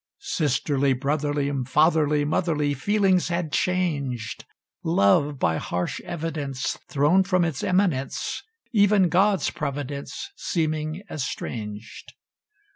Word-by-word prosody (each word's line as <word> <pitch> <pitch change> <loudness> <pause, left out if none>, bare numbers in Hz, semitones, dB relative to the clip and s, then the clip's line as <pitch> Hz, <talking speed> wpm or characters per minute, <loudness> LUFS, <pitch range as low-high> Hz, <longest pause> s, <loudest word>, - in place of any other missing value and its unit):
Sisterly, 140 - +1
brotherly, 145 +1 -1
Fatherly, 150 +1 +3
motherly 150 -2 +1
Feelings 190 +5 +2
had 170 -3 -2
changed: 145 - -1 0.4
Love, 145 - +3
by 80 -10 +1
harsh 90 +2 -3
evidence, 150 -5 -3
Thrown 150 +7 +4
from 185 -2 +2
its 155 -5 -3
eminence; 180 -8 0 0.3
Even 205 -4 +4
God's 195 +2 +3
providence 145 - -5
Seeming 155 - -2
estranged. 115 -6 -6
150 Hz, 95 wpm, -25 LUFS, 140-175 Hz, 0.4 s, Thrown